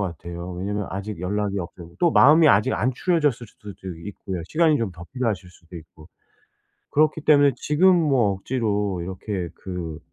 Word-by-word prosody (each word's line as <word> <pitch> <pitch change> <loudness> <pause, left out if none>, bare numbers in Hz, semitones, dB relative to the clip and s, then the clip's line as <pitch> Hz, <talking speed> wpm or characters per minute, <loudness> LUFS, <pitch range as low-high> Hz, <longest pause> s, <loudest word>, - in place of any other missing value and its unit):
같아요. 85 -1 -5
왜냐하면 100 +2 -3
아직 100 +1 -5
연락이 100 +2 -2
없고 85 -1 -9
또 175 - +4
마음이 155 +2 +6
아직 105 -4 +3
안 125 +4 0
추려졌을 145 -5 0
수도 105 0 -12 0.4
있고요. 95 -3 -6
시간이 160 -1 +3
좀 115 -5 -2
더 85 +1 -11
필요하실 110 -8 -2
수도 85 0 -19
있고. 80 -1 -14 0.8
그렇기 155 +1 +2
때문에 145 -2 +5
지금 180 +6 +3
뭐 135 - +2
억지로 105 -3 -2
이렇게 95 0 -5
그 85 -4 -6
100 Hz, 350 characters per minute, -23 LUFS, 90-140 Hz, 0.8 s, 마음이